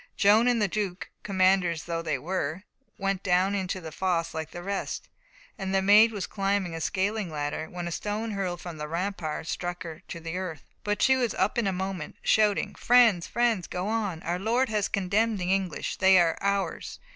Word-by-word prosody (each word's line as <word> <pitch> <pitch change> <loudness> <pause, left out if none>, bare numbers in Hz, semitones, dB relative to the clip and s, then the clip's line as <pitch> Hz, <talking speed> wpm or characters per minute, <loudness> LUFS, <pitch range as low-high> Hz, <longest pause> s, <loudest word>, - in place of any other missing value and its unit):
Joan 215 +3 +5
and 245 -2 +3
the 210 - +2
Duke, 195 -2 -3
commanders 185 -4 +2
though 170 -1 -3
they 160 -2 -1
were, 180 0 -3 0.3
went 195 -1 -1
down 185 +1 +2
into 190 -1 -2
the 160 -3 -8
fosse 170 -1 -1
like 160 -1 -4
the 175 - -8
rest, 200 +1 -4 0.5
and 195 0 -2
the 195 - +3
Maid 210 +3 +7
was 200 -4 -3
climbing 195 -3 -1
a 165 - -5
scaling 200 +2 -1
ladder, 150 +1 -3
when 175 -1 -5
a - - -4
stone 210 +5 -3
hurled 190 -3 -3
from 175 -3 -7
the 150 - -4
rampart 170 -2 -3
struck 175 +2 -4
her 165 -2 -8
to 170 - -6
the 165 +1 -5
earth. 180 -6 -5 0.2
But 205 0 0
she 265 - +5
was 245 -3 0
up 210 +6 +1
in 225 - +1
a - - +2
moment, 190 -3 -4
shouting: 210 -2 +2
"Friends, 230 -8 +4
friends, 235 -6 +1
go 180 +2 -3
on! 205 -7 -2
Our 175 +1 -1
Lord 235 +6 +1
has 210 -2 0
condemned 205 +3 +1
the 180 0 0
English! 190 -5 -2
They 190 0 +6
are 170 -2 +4
ours! 200 0 -1
190 Hz, 200 wpm, -27 LUFS, 175-205 Hz, 0.5 s, Maid